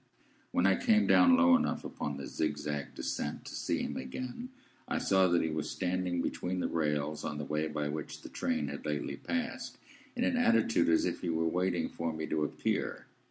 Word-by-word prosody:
When - - +2
I - - +5
came 220 -3 +5
down 260 -1 +6
low 260 -1 +7
enough 255 - 0
upon 75 -2 -4
the 70 - -6
zigzag 75 -2 -3
descent 65 - -3
to - - -8
see - - -1
him - - -3
again, 125 - -5 0.4
I - - -1
saw 95 -1 +4
that 85 -1 +3
he 80 - -1
was 75 -1 -2
standing 90 -1 -1
between 90 +1 -2
the - - 0
rails 75 -1 -1
on 75 - -3
the 75 - -4
way 75 +2 -1
by 75 -1 -2
which 75 +1 -5
the - - -8
train 75 - -1
had 70 - -6
lately 75 -2 -2
passed, 255 +1 -3 0.4
in 245 - 0
an 255 0 +2
attitude 235 - +3
as 80 - +4
if - - -2
he 90 - -2
were 80 0 +1
waiting 90 +1 0
for 85 -1 -3
me 80 0 -4
to 80 -1 0
appear. 75 - -2
85 Hz, 205 wpm, -32 LUFS, 75-115 Hz, 0.4 s, low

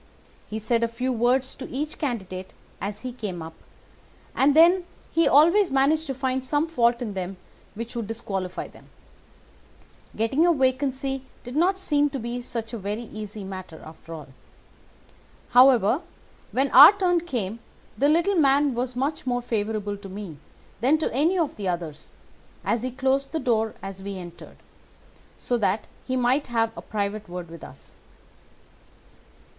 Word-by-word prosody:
He 215 - -4
said 230 +2 +1
a - - +3
few 250 +3 -2
words 250 +3 +2
to 265 - -8
each 300 +4 -4
candidate 190 - -4 0.3
as 205 +2 -4
he 255 - -5
came 195 -8 -5
up, 160 0 -9 0.8
and 280 +2 +3
then 350 +3 +6 0.3
he 330 - +3
always 340 +7 +5
managed 295 +4 +2
to 270 - -3
find 260 0 -1
some 290 +3 +1
fault 240 -6 +2
in 215 -4 -4
them 190 0 -5 0.4
which 230 +3 -6
would 230 -3 -3
disqualify 195 -5 -4
them. - - -17 1.3
Getting 225 +8 +2
a 345 - +5
vacancy 270 0 0 0.2
did 245 +2 -8
not 365 +5 +3
seem 295 -6 +2
to 275 - -4
be 240 +1 -4
such 230 -2 -5
a 230 - -4
very 205 +4 -3
easy 215 -2 -8
matter, 185 -4 -8
after 160 +1 -13
all. 155 -4 -8 1.2
However, 250 - +5 0.5
when 270 +1 +1
our 290 +9 +11
turn 360 -3 +2
came 235 - -3 0.4
the 285 +2 +2
little 340 +6 +3
man 285 -4 +3
was 245 +1 -3
much 275 +2 -2
more 245 -1 0
favourable 210 -3 -2
to 200 -1 -10
me 190 -5 -7 0.4
than 265 +7 +3
to 310 - -2
any 320 +9 +2
of 325 -5 -1
the 200 -2 -3
others, 170 -4 -4 0.5
and 235 - +1
he 255 - -2
closed 270 +2 0
the 320 - 0
door 225 -5 0
as 195 0 -7
we 200 0 -5
entered, 175 -2 -11 0.8
so 245 -1 -1
that 205 0 0 0.2
he 260 - -1
might 255 +3 +2
have 225 -2 0
a - - -7
private 205 -1 -3
word 175 -1 -7
with 170 - -10
us. 135 - -13
240 Hz, 160 wpm, -25 LUFS, 205-275 Hz, 1.3 s, our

